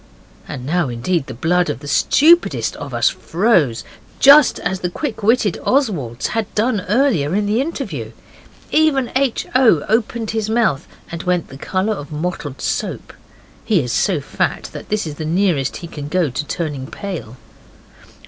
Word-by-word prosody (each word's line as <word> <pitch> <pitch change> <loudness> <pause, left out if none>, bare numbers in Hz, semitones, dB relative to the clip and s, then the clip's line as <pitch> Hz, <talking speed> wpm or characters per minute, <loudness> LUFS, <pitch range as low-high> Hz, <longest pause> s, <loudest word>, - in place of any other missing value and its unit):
And 125 - -6
now 165 0 0
indeed 135 +6 -1
the 130 - -7
blood 175 +7 +1
of - - -2
the 145 - -10
stupidest 330 - +3
of - - -7
us - - +2
froze, 165 - +1 0.4
just 280 0 +7
as 185 +1 -2
the 180 - -2
quick 245 - -4
witted 215 -3 +2
Oswald's 170 - 0
had 225 -2 -2
done 215 -1 +1
earlier 210 - +2
in 210 0 +1
the 215 +4 +1
interview. 195 - -4 0.6
Even 300 -5 +2
H. 265 -2 +1
O. 235 - +4
opened 225 +1 0
his 220 -1 -2
mouth 220 -11 +1 0.2
and 165 0 -5
went 180 -2 -1
the 135 - -10
colour 190 +7 -1
of 145 -6 -8
mottled 150 -3 -4
soap; - - -3 0.5
he 210 -5 +2
is 125 -5 -2
so - - +1
fat - - -2
that - - -9
this 210 -2 0
is 150 -2 -6
the - - -4
nearest 160 -5 0
he - - -7
can 145 -3 -7
go 165 -2 0
to 150 +4 -3
turning 145 -5 -4
pale. 165 - -7
180 Hz, 165 wpm, -19 LUFS, 145-225 Hz, 0.6 s, just